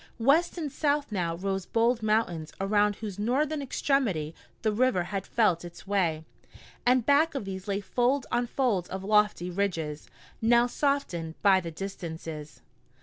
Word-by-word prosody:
West 295 Hz, +10 st, +3 dB
and 305 Hz, -4 st, -3 dB
south 290 Hz, -2 st, 0 dB
now 175 Hz, -5 st, -1 dB
rose 195 Hz, +1 st, -3 dB
bold 230 Hz, +1 st, +2 dB
mountains 215 Hz, -8 st, 0 dB
around 205 Hz, +1 st, +2 dB
whose 205 Hz, -3 st, -7 dB
northern 285 Hz, +7 st, 0 dB
extremity 245 Hz, -, 0 dB, 0.3 s
the 215 Hz, -, +2 dB
river 235 Hz, -4 st, +2 dB
had 195 Hz, +2 st, -4 dB
felt 190 Hz, -8 st, +2 dB
its 175 Hz, 0 st, -10 dB
way, 170 Hz, -6 st, 0 dB, 0.6 s
and 250 Hz, -2 st, +4 dB
back 295 Hz, +2 st, +3 dB
of 270 Hz, -, -3 dB
these 190 Hz, 0 st, -6 dB
lay 200 Hz, 0 st, 0 dB
fold 245 Hz, +6 st, +1 dB
on 240 Hz, 0 st, +1 dB
fold 230 Hz, -9 st, 0 dB
of 190 Hz, 0 st, -5 dB
lofty 210 Hz, -3 st, +2 dB
ridges, 165 Hz, -6 st, -2 dB, 0.3 s
now 235 Hz, +1 st, +5 dB
softened 245 Hz, -, -1 dB
by 195 Hz, -2 st, +6 dB
the 170 Hz, -2 st, -5 dB
distances. 160 Hz, -4 st, -7 dB
205 Hz, 150 wpm, -28 LUFS, 180-250 Hz, 0.6 s, by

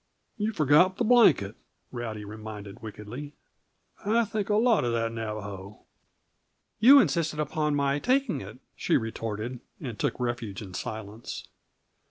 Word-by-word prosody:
"You 215 Hz, +1 st, -1 dB
forgot 160 Hz, +2 st, +4 dB
the -, -, +1 dB
blanket," 170 Hz, -, +5 dB, 0.4 s
Rowdy 110 Hz, -4 st, -5 dB
reminded 105 Hz, -1 st, -8 dB
wickedly. 115 Hz, +7 st, -8 dB, 0.7 s
"I 225 Hz, +3 st, +3 dB
think 210 Hz, -1 st, -3 dB
a 210 Hz, -, +3 dB
lot 230 Hz, -, +4 dB
of 120 Hz, -1 st, 0 dB
that 115 Hz, 0 st, 0 dB
Navajo." 105 Hz, -3 st, -6 dB, 1.0 s
"You 265 Hz, +6 st, +9 dB
insisted 160 Hz, -, +1 dB
upon 150 Hz, 0 st, 0 dB
my 140 Hz, 0 st, +1 dB
taking 260 Hz, -, +1 dB
it," 100 Hz, +5 st, -9 dB, 0.2 s
she -, -, +2 dB
retorted, 115 Hz, +1 st, -4 dB, 0.2 s
and 125 Hz, -8 st, -6 dB
took -, -, -1 dB
refuge 120 Hz, -5 st, -3 dB
in 95 Hz, -4 st, -9 dB
silence. 110 Hz, +3 st, -6 dB
120 Hz, 135 wpm, -28 LUFS, -, 1.0 s, You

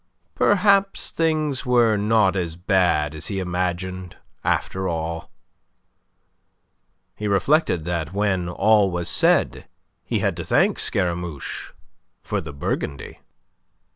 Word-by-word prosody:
Perhaps 200 Hz, 0 st, +2 dB
things 155 Hz, -5 st, 0 dB
were 120 Hz, -4 st, +3 dB
not 105 Hz, -1 st, +2 dB
as 85 Hz, -4 st, -2 dB
bad 90 Hz, -5 st, +1 dB
as 80 Hz, +1 st, -3 dB
he 100 Hz, -, -3 dB
imagined, 90 Hz, 0 st, -3 dB, 0.3 s
after 95 Hz, 0 st, -1 dB
all. 80 Hz, -1 st, -4 dB, 1.9 s
He 105 Hz, -, -4 dB
reflected 100 Hz, -, +2 dB
that, 85 Hz, -2 st, -2 dB
when 95 Hz, -3 st, 0 dB
all 105 Hz, +2 st, +3 dB
was 85 Hz, -1 st, -3 dB
said, -, -, +2 dB, 0.4 s
he -, -, -2 dB
had -, -, 0 dB
to -, -, -4 dB
thank -, -, +2 dB
Scaramouche 85 Hz, -4 st, -2 dB, 0.5 s
for -, -, -2 dB
the 80 Hz, -, -8 dB
Burgundy. 70 Hz, -1 st, -4 dB
95 Hz, 110 wpm, -22 LUFS, 85-110 Hz, 1.9 s, were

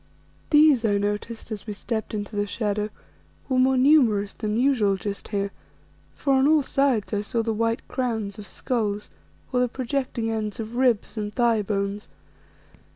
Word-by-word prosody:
These, 295 Hz, -5 st, +6 dB
I 205 Hz, -2 st, +2 dB
noticed, 210 Hz, +3 st, -3 dB
as 215 Hz, 0 st, -6 dB
we 210 Hz, -, -3 dB
stepped 220 Hz, +1 st, -4 dB
into 205 Hz, +1 st, -5 dB
the 205 Hz, 0 st, 0 dB
shadow, 210 Hz, -1 st, -1 dB, 0.6 s
were 260 Hz, -2 st, +1 dB
more 260 Hz, +1 st, +4 dB
numerous 250 Hz, -8 st, +4 dB
than 215 Hz, 0 st, -2 dB
usual 240 Hz, -6 st, +3 dB
just 200 Hz, +1 st, -5 dB
here, 200 Hz, -1 st, -2 dB, 0.6 s
for 275 Hz, -, +1 dB
on 265 Hz, +1 st, +4 dB
all 310 Hz, -1 st, +4 dB
sides 260 Hz, -6 st, +1 dB
I 205 Hz, -, +1 dB
saw 225 Hz, +2 st, -1 dB
the 225 Hz, 0 st, -1 dB
white 230 Hz, +1 st, -1 dB
crowns 225 Hz, -5 st, -2 dB
of 205 Hz, -, -9 dB
skulls, 210 Hz, 0 st, -2 dB, 0.4 s
or 250 Hz, -, +3 dB
the 250 Hz, -, +3 dB
projecting 250 Hz, -2 st, -2 dB
ends 215 Hz, -1 st, -3 dB
of 225 Hz, +1 st, -5 dB
ribs 240 Hz, -3 st, +1 dB
and 210 Hz, 0 st, -3 dB
thigh 235 Hz, -1 st, +2 dB
bones. 200 Hz, 0 st, -2 dB
225 Hz, 165 wpm, -25 LUFS, 205-255 Hz, 0.6 s, These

